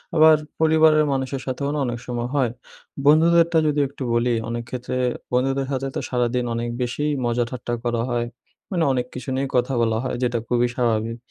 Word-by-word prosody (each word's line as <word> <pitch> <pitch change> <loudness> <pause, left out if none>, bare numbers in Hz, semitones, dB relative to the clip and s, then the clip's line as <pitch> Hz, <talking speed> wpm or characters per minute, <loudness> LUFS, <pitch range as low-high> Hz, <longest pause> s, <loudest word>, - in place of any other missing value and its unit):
আবার 155 0 +7 0.2
পরিবারের 155 -1 +5
মানুষের 130 0 -2
সাথেও 135 +2 -2
না 150 - -1
অনেক 120 -1 -3
সময় 120 0 -3
হয়। 125 -5 +2 0.5
বন্ধুদেরটা 165 +2 +5
যদি 150 0 +1
একটু 140 -1 -8
বলি, 120 +1 +2 0.2
অনেক 120 0 -3
ক্ষেত্রে 125 0 -4 0.4
বন্ধুদের 135 +1 +1
সাথে 135 0 -1
তো - - 0
সারাদিন 125 0 0
অনেক 120 +1 -2
বেশিই 145 +5 -1
মজা 120 0 +1
ঠাট্টা 120 -1 -5
করা 120 -1 0
হয় 120 -1 -1 0.4
মানে 175 -3 +1
অনেক 125 -1 -1
কিছু 125 +2 -6
নিয়েই 135 0 -1
কথা 125 +2 +1
বলা 110 -1 +1
হয় 125 - -2
যেটা 120 -1 +1
খুবই 120 0 +2
স্বাভাবিক। 115 -1 0
125 Hz, 180 wpm, -23 LUFS, 120-145 Hz, 0.5 s, আবার